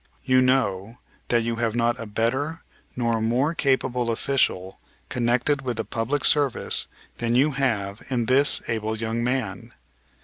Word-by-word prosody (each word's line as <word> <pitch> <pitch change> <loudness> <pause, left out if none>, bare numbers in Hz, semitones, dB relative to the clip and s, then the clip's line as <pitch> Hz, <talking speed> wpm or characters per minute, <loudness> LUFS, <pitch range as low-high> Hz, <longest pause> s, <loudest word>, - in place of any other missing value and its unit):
You 130 0 +4
know 115 -4 0 0.3
that 120 -1 +2
you 115 0 -2
have 115 -1 -1
not 120 +1 +1
a 115 - -6
better 130 +10 -1 0.3
nor 115 -2 0
a - - -3
more 125 +8 +1
capable 130 -5 0
official 115 -6 0 0.3
connected 125 +4 +1
with 125 -3 -3
the 110 - -2
public 130 +5 -2
service 145 -4 +1 0.3
than 120 0 0
you 140 +5 +4
have 110 -7 -1
in 120 -3 0
this 135 +4 +4
able 110 -1 -2
young 115 +1 -2
man. 125 -1 -3
120 Hz, 150 wpm, -24 LUFS, 115-130 Hz, 0.3 s, You